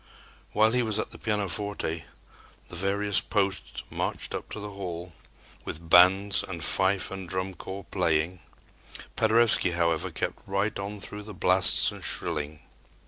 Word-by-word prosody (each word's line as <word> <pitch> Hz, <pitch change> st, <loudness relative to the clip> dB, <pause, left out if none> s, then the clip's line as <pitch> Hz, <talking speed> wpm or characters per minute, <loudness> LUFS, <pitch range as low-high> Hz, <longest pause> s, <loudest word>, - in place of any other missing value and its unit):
While 110 Hz, +1 st, +3 dB
he 125 Hz, +1 st, +2 dB
was 110 Hz, -3 st, 0 dB
at 110 Hz, -, -3 dB
the -, -, -12 dB
pianoforte, 100 Hz, -5 st, -2 dB, 0.6 s
the -, -, -8 dB
various 100 Hz, +3 st, +3 dB
posts 100 Hz, -3 st, -2 dB
marched -, -, -3 dB
up -, -, -6 dB
to -, -, -6 dB
the 105 Hz, 0 st, -7 dB
hall 90 Hz, -3 st, -7 dB, 0.5 s
with 80 Hz, +1 st, -8 dB
bands 95 Hz, +3 st, +5 dB
and 85 Hz, -4 st, -6 dB
fife 95 Hz, +4 st, +4 dB
and 95 Hz, -2 st, -7 dB
drum 95 Hz, +1 st, -3 dB
corps 95 Hz, +2 st, -8 dB
playing. 85 Hz, -1 st, 0 dB, 0.8 s
Paderewski, 110 Hz, -5 st, +3 dB
however, 85 Hz, -2 st, 0 dB
kept -, -, -4 dB
right 100 Hz, +2 st, -1 dB
on 100 Hz, +1 st, -6 dB
through 105 Hz, +1 st, -6 dB
the 105 Hz, -1 st, -10 dB
blasts 95 Hz, 0 st, +5 dB
and -, -, -10 dB
shrilling. 75 Hz, -1 st, -2 dB
95 Hz, 145 wpm, -27 LUFS, 85-105 Hz, 0.8 s, bands